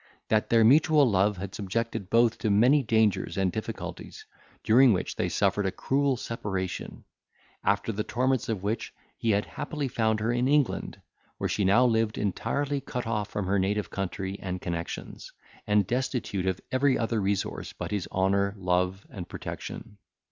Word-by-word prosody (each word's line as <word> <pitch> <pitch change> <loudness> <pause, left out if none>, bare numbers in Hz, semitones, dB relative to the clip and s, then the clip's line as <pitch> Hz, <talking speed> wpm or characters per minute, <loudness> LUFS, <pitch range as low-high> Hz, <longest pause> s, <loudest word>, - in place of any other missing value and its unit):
That 110 -1 +2
their 115 -1 +5
mutual 150 +3 +5
love 100 -1 +2
had 95 +1 -6
subjected 100 -1 -3
both 115 0 +3
to 110 - 0
many 125 +9 +5
dangers 110 -5 +1
and 95 -2 +1
difficulties, - - -6 0.4
during 125 +2 +6
which 90 - -2
they - - -1
suffered 100 0 +1
a - - 0
cruel 135 +3 0
separation; 95 -6 -4 0.6
after 100 +2 +1
the 105 0 -2
torments 125 +2 0
of 105 -4 -2
which, 105 +3 -3 0.2
he 115 - -2
had 105 -1 +2
happily 145 -1 -4
found 110 -3 +1
her 110 +2 0
in 120 +1 +1
England, 145 -2 +1 0.4
where - - -1
she 105 - 0
now 110 +7 +5
lived 115 -2 +1
entirely 140 +8 -1
cut 125 -2 -4
off 105 -3 -2
from 105 -2 -3
her 100 +1 +1
native 100 +2 -1
country 95 +1 -4
and 90 -1 -4
connexions, 85 -1 -5 0.4
and 105 -1 +3
destitute 120 -4 -2
of 95 -1 0
every 130 +1 +3
other 115 -1 0
resource 100 0 -2
but - - -6
his 100 -3 -2
honour, 100 +1 +1
love, 90 +1 0
and 90 -4 -7
protection. 105 - -7
105 Hz, 165 wpm, -27 LUFS, 95-120 Hz, 0.6 s, during